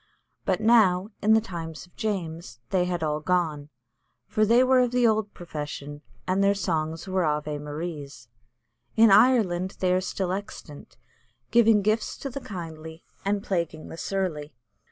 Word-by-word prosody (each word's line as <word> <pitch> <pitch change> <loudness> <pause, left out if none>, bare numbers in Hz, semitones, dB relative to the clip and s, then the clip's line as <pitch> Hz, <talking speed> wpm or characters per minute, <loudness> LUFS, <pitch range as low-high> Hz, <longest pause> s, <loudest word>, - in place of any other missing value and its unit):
But 190 -1 +1
now, 215 -4 +4
in 220 +1 +5
the - - +5
times 170 -7 -7
of 175 - -27
James, 170 - -4
they 180 -2 +2
had 175 -2 -2
all 150 -1 0
gone, 155 -3 -1 0.6
for 215 - 0
"they 235 +3 +5
were 260 0 +4
of 250 -1 +3
the 245 0 +2
old 220 -2 +1
profession," 145 -3 -7 0.2
and 190 +2 +1
"their 200 0 +3
songs 160 -3 -2
were 185 -1 0
Ave 150 -1 -1
Maries." 145 -4 -7 0.7
In 225 -1 +7
Ireland 195 -5 +4
they 180 -1 +2
are 185 - +2
still 185 -1 -2
extant, 185 -6 -7 0.5
giving 225 -3 +5
gifts 215 +2 0
to 275 - -6
the 275 - -6
kindly, 160 -5 -8 0.2
and 200 0 -1
plaguing 170 -5 -3
the - - -8
surly. 160 -8 -3
180 Hz, 155 wpm, -26 LUFS, 160-210 Hz, 0.7 s, In